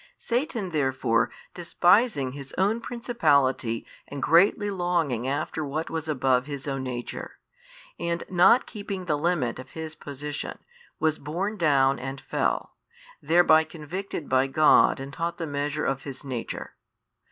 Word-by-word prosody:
Satan 235 - -2
therefore 130 -6 +1 0.2
despising 175 - +2
his 135 0 -9
own 210 +5 +2
principality 140 - +1 0.2
and 140 - -6
greatly 200 +4 +4
longing 170 - 0
after 155 +3 -2
what 150 +3 -3
was 160 -1 -3
above 130 -3 +1
his 140 -2 -5
own 135 -1 -2
nature, 125 -2 -6 0.6
and 170 0 -2
not 185 +7 +5
keeping 200 -3 -6
the 155 - +1
limit 145 -7 0
of 130 0 -11
his 160 -1 -5
position, 145 -1 -6 0.4
was 155 -1 +1
borne 180 +9 -3
down 140 -7 +3
and 135 +1 -5
fell, - - -2 0.5
thereby 160 -2 +5
convicted 165 +1 -6
by 130 +1 +3
God 150 0 +5
and 135 +1 -7
taught 170 +2 -3
the 165 - -3
measure 145 0 -2
of 135 -1 -1
his 135 0 -7
nature. 125 -4 -5
155 Hz, 140 wpm, -26 LUFS, 135-175 Hz, 0.6 s, not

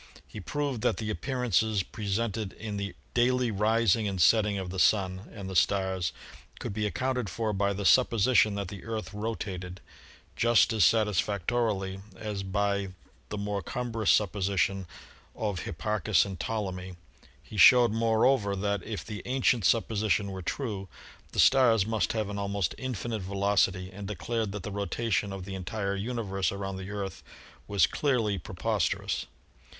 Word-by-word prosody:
He - - -9
proved 140 +3 -2
that - - +1
the 110 -1 -3
appearances 110 -2 0
presented 105 0 -3
in 105 -2 -6
the 100 -2 -4 0.2
daily 125 0 +2
rising 110 +1 +2
and 95 -2 -3
setting 105 +2 +4
of 95 -2 -4
the 95 - -4
Sun 95 0 +2
and 100 -3 -7
the 95 - -6
stars 95 -2 +1 0.5
could - - -4
be 105 +1 -1
ac 100 - -5
counted 125 -3 -1
for 110 +4 -2
by 100 0 +1
the 100 0 -3
supposition 115 -2 +4
that 100 -3 -3
the 100 -2 -9
Earth 110 -1 -5
rotated, 95 -4 -4 0.6
just 120 -1 +4
as 110 - +3
satisfactorily 105 -1 +1 0.2
as 105 -2 -4
by 100 0 -1 0.4
the 105 - -4
more 100 0 -2
cumbrous 115 +1 -2
supposition 95 -2 +1 0.5
of 105 -4 -2
Hipparchus 95 +3 +1
and 95 -3 -7
Ptolemy. 95 -4 -3 0.5
He 105 - -10
showed, 120 +3 +8
moreover, 115 -1 +2
that 100 0 -1
if 105 +2 -6
the 105 -2 -6
ancient 125 -4 +2
supposition 110 -3 +1
were 95 -1 -6
true, 100 -1 -3 0.4
the - - -4
stars 120 -7 +5
must 110 0 0
have 110 -2 -1
an 100 0 -4
almost 100 -3 -1
infinite 120 -4 -3
velocity 95 -1 +1
and 100 0 -7
declared 105 +2 -2
that 105 -3 -5
the 105 - -5
rotation 100 +1 -1
of 95 -2 -6
the 95 - -6
entire 100 +1 -3
universe 100 -4 -2
around 95 -1 -4
the 95 +1 -7
Earth 100 -3 -5 0.5
was 100 -1 +4
clearly 115 -9 0
pre - - -9
posterous. - - -1
100 Hz, 155 wpm, -29 LUFS, 95-115 Hz, 0.6 s, showed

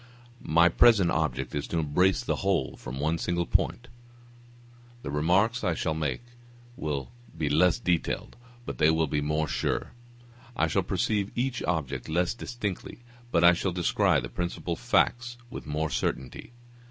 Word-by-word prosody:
My 85 +2 +4
present 100 -3 +5
object 65 -5 -1
is 75 0 -3
to 85 - -2
embrace 85 +5 +2
the - - -1
whole - - 0
from 65 +3 -7
one 80 +3 0
single 85 0 -1
point; 120 +7 0 1.2
the - - -4
remarks 95 +11 +2
I 85 - +1
shall 80 - -1
make 75 - -2 0.5
will 70 - -4 0.3
be 75 -3 -1
less 85 +5 +4
detailed, 90 -8 -1 0.3
but - - -6
they 75 0 +5
will 80 0 +2
be 75 0 -1
more 75 +1 0
sure. - - -2 0.6
I 80 - +2
shall 80 - +1
perceive 105 -2 -1
each 125 +1 -1
object 70 -7 -2
less 85 +2 +1
distinctly, 120 -2 -5 0.3
but 85 -1 +3
I 85 0 +8
shall 90 +1 -1
descry 90 -1 +2
the - - -6
principal 85 -1 -3
facts 120 +2 +1
with - - -8
more 75 +1 -2
certainty. 65 - -3
85 Hz, 155 wpm, -27 LUFS, 75-95 Hz, 1.2 s, I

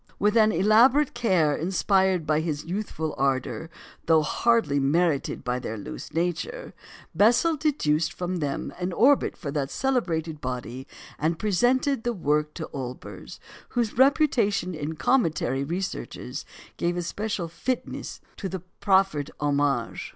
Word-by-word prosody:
With 210 +2 +2
an 220 -1 +5
elaborate 235 - +4
care 185 -11 +2
inspired 190 0 +1
by 155 0 +2
his 155 -2 -3
youthful 170 -4 -3
ardour, 135 +4 -1 0.4
though 160 -1 +5
hardly 225 -5 +2
merited 150 +1 +1
by 125 0 -1
their 110 -2 -5
loose 100 - -8
nature, 175 - -3 0.4
Bessel 235 - +4
deduced 170 - +1
from 180 -1 -3
them 145 -4 -3
an 180 0 -2
orbit 270 +9 +3
for 145 -5 -5
that 140 -2 -2
celebrated 165 - -1
body, 125 0 -5 0.3
and 160 +2 0
presented 245 - +1
the 240 - 0
work 150 -4 0
to 160 - -5
Olbers, 130 -2 -7 0.3
whose 235 -3 -1
reputation 245 - +3
in 155 0 -4
cometary 155 - +1
researches 180 +6 -5 0.3
gave 175 +1 -1
a 175 - -1
special 205 0 -3
fitness 250 +10 -4 0.2
to 195 - -4
the 185 -2 -5 0.2
proffered 190 -7 +2
homage. 140 -4 0
175 Hz, 135 wpm, -26 LUFS, 150-220 Hz, 0.4 s, an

